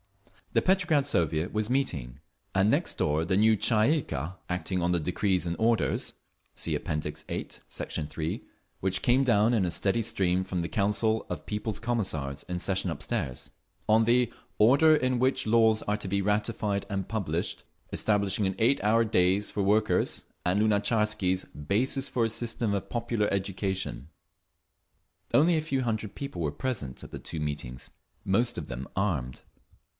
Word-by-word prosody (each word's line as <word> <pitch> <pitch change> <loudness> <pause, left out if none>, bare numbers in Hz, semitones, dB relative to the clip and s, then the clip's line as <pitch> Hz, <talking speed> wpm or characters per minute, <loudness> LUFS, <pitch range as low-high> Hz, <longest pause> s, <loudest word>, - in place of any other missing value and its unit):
The - - +3
Petrograd 180 -7 +3
Soviet 80 - 0
was 105 +1 0
meeting, 75 - -1 0.3
and 95 +2 +3
next - - +1
door 75 +2 +1
the 95 +3 +1
new 110 +1 +5
Tsay 115 +8 +3
ee - - -3
kah, 80 - -5
acting 90 +1 -1
on 85 +1 +1
the 90 - +2
decrees 90 +3 0
and 85 0 -2
orders 115 0 +1 0.4
(See - - -1
App. - - -5
VIII, 75 0 -3 0.2
Sect. - - -3
3) 80 +1 -3 0.4
which 95 0 -1
came 130 +2 +4
down 115 -2 +3
in 110 -5 +2
a 90 - 0
steady 100 +6 +2
stream 95 -3 +1
from 95 -1 -3
the 85 - -1
Council 105 +3 +1
of - - -5
People's 105 0 -3
Commissars 95 - -2
in 90 0 -2
session 95 0 0
upstairs; 65 -5 -3 0.4
on 110 +1 +5
the 120 +1 +2 0.2
Order 140 +9 +6
in 130 -3 +1
Which 130 +1 +2
Laws 110 -1 +4
Are 105 - 0
to 105 - -6
be 100 +1 0
Ratified 105 0 0
and 95 -2 -3
Published, 90 -6 -2 0.3
Establishing 100 -1 +1
an 95 - -2
Eight 115 0 +2
hour 115 +2 +4
Days 95 0 +2
for 105 - -2
Workers, 105 -2 +1 0.2
and 90 +3 +1
Lunatcharsky's 105 -3 +1
"Basis 120 - -1
for 120 -2 +1
a - - 0
System 115 -1 -1
of 100 - -3
Popular 115 -3 -1
Education." 95 - -2 1.2
Only 165 +4 +5
a 155 - +1
few 135 -4 -1
hundred 110 -3 -2
people 140 -9 -5
were 75 -3 0
present 75 - -4
at - - -11
the - - -6
two 80 - -5
meetings, 70 -5 -5 0.3
most 115 +5 +1
of 85 - -5
them 65 +2 -6
armed. 75 -11 -1
105 Hz, 165 wpm, -28 LUFS, 90-115 Hz, 1.2 s, Order